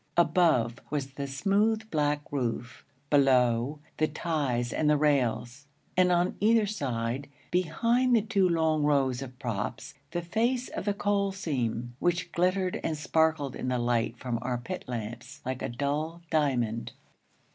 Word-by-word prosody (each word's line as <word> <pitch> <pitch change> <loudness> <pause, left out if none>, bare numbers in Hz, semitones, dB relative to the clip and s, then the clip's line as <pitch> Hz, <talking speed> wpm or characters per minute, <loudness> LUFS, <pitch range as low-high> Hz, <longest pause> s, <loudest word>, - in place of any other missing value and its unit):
Above 160 -9 +3
was 140 -2 -2
the 140 +1 -5
smooth, 205 +10 +1
black 150 -1 +1
roof; 125 -2 -3 0.3
below, 130 -1 +3 0.2
the 155 - +2
ties 145 -7 -1
and 150 - +2
the 150 - +4
rails; 140 -2 0 0.3
and 180 0 +4
on 175 +1 +2
either 220 +1 +4
side, 130 - -2 0.2
behind 230 +9 +2
the 225 - +4
two 200 -4 +2
long 160 -2 +2
rows 135 -4 +2
of 130 -2 -8
props, 115 -1 -4 0.2
the 175 +2 -3
face 235 +8 0
of - - -5
the 205 - +1
coal 200 -1 +1
seam, 120 -9 -2
which 175 0 0
glittered 185 +1 +1
and 160 -1 -1
sparkled 155 -3 +1
in - - -4
the 125 0 +1
light 120 -1 0
from 120 -2 -3
our 125 0 -1
pit 120 0 -6
lamps 120 +4 -6
like 130 0 -3
a - - -2
dull 150 +7 -2
diamond. 120 -7 0
145 Hz, 150 wpm, -29 LUFS, 125-175 Hz, 0.3 s, the